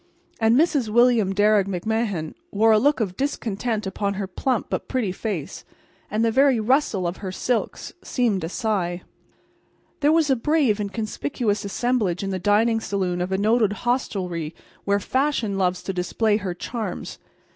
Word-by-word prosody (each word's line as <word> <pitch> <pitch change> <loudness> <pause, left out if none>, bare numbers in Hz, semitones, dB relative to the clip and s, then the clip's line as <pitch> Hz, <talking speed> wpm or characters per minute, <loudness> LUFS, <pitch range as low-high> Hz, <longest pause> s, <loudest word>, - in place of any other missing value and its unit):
And 225 0 +4
Mrs. 285 -7 +2
William 235 -3 +4
Darragh 205 0 +3
McMahan 195 -3 -2 0.2
wore 220 +2 +4
a 215 - +5
look 290 +4 +2
of 190 -4 -2
discontent 225 -5 -2
upon 200 +1 -2
her 195 0 -2
plump 230 +6 -1
but - - -3
pretty 245 -8 -1
face, 180 -6 -4 0.5
and 220 +2 +1
the 225 - +2
very 265 0 +4
rustle 220 -5 +1
of 175 +2 -2
her 190 -2 -5
silks 235 +5 -2
seemed 225 -8 0
a 160 - -3
sigh. 185 -4 -2 1.0
There 295 +1 +3
was 315 -3 +3
a - - +5
brave 260 -4 +2
and 200 -1 -3
conspicuous 215 - -2
assemblage 205 -4 0
in 195 - -2
the 190 - -2
dining 220 +4 +3
saloon 185 -4 -2
of 180 +1 -2
a 190 - +1
noted 215 +1 +2
hostelry 180 -10 -1 0.3
where 200 0 +2
Fashion 260 -3 0
loves 180 -1 0
to 195 - -3
display 205 +4 +1
her 190 -4 -4
charms. 215 -1 -5
210 Hz, 165 wpm, -23 LUFS, 190-240 Hz, 1.0 s, a